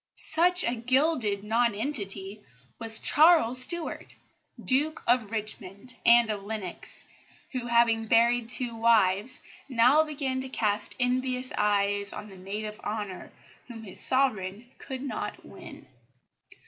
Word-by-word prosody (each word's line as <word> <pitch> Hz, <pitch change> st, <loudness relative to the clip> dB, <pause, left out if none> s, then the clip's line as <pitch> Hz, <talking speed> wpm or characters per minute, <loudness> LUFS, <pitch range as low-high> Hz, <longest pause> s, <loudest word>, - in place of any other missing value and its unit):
Such 360 Hz, +2 st, +4 dB
a 235 Hz, -, 0 dB
gilded 245 Hz, -4 st, 0 dB
nonentity 215 Hz, -3 st, -2 dB, 0.4 s
was 225 Hz, -1 st, +4 dB
Charles 295 Hz, -6 st, +4 dB
Stuart, 340 Hz, +5 st, -3 dB, 0.4 s
Duke 295 Hz, +4 st, +2 dB
of 240 Hz, -3 st, +1 dB
Richmond 215 Hz, +1 st, -7 dB
and 235 Hz, -1 st, +5 dB
of 205 Hz, -2 st, -5 dB
Lennox, 205 Hz, -4 st, -5 dB, 0.5 s
who, 250 Hz, -2 st, -4 dB
having 230 Hz, -1 st, +2 dB
buried 235 Hz, +1 st, +2 dB
two 250 Hz, -1 st, +1 dB
wives, 225 Hz, 0 st, +1 dB, 0.3 s
now 260 Hz, +5 st, +4 dB
began 275 Hz, -4 st, -4 dB
to 260 Hz, -, -6 dB
cast 210 Hz, -4 st, -2 dB
envious 255 Hz, 0 st, -1 dB
eyes 200 Hz, -1 st, +1 dB
on 210 Hz, 0 st, -8 dB
the 195 Hz, -, -13 dB
maid 195 Hz, +3 st, -6 dB
of 210 Hz, 0 st, -8 dB
honour 205 Hz, -4 st, -6 dB, 0.4 s
whom 230 Hz, -3 st, -10 dB
his 190 Hz, -4 st, -5 dB
Sovereign 235 Hz, -4 st, +1 dB
could 265 Hz, -1 st, -7 dB
not 280 Hz, -, -6 dB
win. -, -, -13 dB
230 Hz, 125 wpm, -27 LUFS, 210-255 Hz, 0.5 s, and